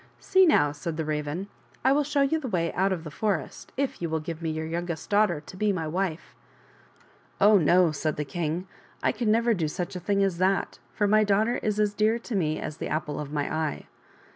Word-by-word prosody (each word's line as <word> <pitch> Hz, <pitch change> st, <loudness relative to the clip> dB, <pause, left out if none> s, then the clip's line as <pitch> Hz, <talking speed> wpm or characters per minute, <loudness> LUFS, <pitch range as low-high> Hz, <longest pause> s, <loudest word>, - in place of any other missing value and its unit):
" -, -, -34 dB
See 380 Hz, -1 st, +7 dB
now," 145 Hz, -, +4 dB
said 160 Hz, +2 st, -5 dB
the 160 Hz, -, -2 dB
Raven, 150 Hz, +5 st, -3 dB, 0.2 s
*' -, -, -29 dB
I 265 Hz, -, +6 dB
will 295 Hz, +2 st, +3 dB
show 285 Hz, 0 st, +1 dB
you 320 Hz, +4 st, +1 dB
the 280 Hz, -, -5 dB
way 170 Hz, -6 st, -1 dB
out 190 Hz, +2 st, +1 dB
of 175 Hz, -4 st, -2 dB
the 155 Hz, -, -7 dB
forest, 190 Hz, -4 st, -3 dB
if 275 Hz, -7 st, -2 dB
you 170 Hz, -, -1 dB
will 160 Hz, 0 st, 0 dB
give 165 Hz, +1 st, -6 dB
me 165 Hz, -, -2 dB
your 160 Hz, 0 st, -3 dB
youngest 170 Hz, +1 st, -4 dB
daughter 205 Hz, -6 st, +3 dB
to 170 Hz, -, -12 dB
be 210 Hz, +2 st, +1 dB
my 165 Hz, -5 st, -2 dB
wife." 175 Hz, 0 st, -3 dB, 0.5 s
" -, -, -30 dB, 0.3 s
Oh, 205 Hz, 0 st, +6 dB
no," 175 Hz, +1 st, +4 dB
said 155 Hz, +1 st, -2 dB
the 150 Hz, -, -3 dB
king, 165 Hz, +4 st, -3 dB, 0.2 s
" -, -, -29 dB
I -, -, +3 dB
can 230 Hz, -1 st, -1 dB
never 230 Hz, +1 st, +3 dB
do 170 Hz, -6 st, -1 dB
such 175 Hz, +4 st, -4 dB
a -, -, -3 dB
thing 200 Hz, +3 st, +1 dB
as 185 Hz, -3 st, 0 dB
that, 190 Hz, -6 st, +1 dB
for 205 Hz, -, 0 dB
my 215 Hz, +1 st, +4 dB
daughter 210 Hz, +3 st, +2 dB
is 215 Hz, -1 st, -1 dB
as 210 Hz, -1 st, +2 dB
dear 215 Hz, +2 st, +2 dB
to 235 Hz, -1 st, -6 dB
me 155 Hz, -5 st, 0 dB
as 150 Hz, -, -5 dB
the -, -, -4 dB
apple 150 Hz, -2 st, -2 dB
of 145 Hz, -1 st, -5 dB
my 145 Hz, -1 st, -2 dB
eye." 155 Hz, -2 st, -2 dB
180 Hz, 245 wpm, -27 LUFS, 155-210 Hz, 0.5 s, See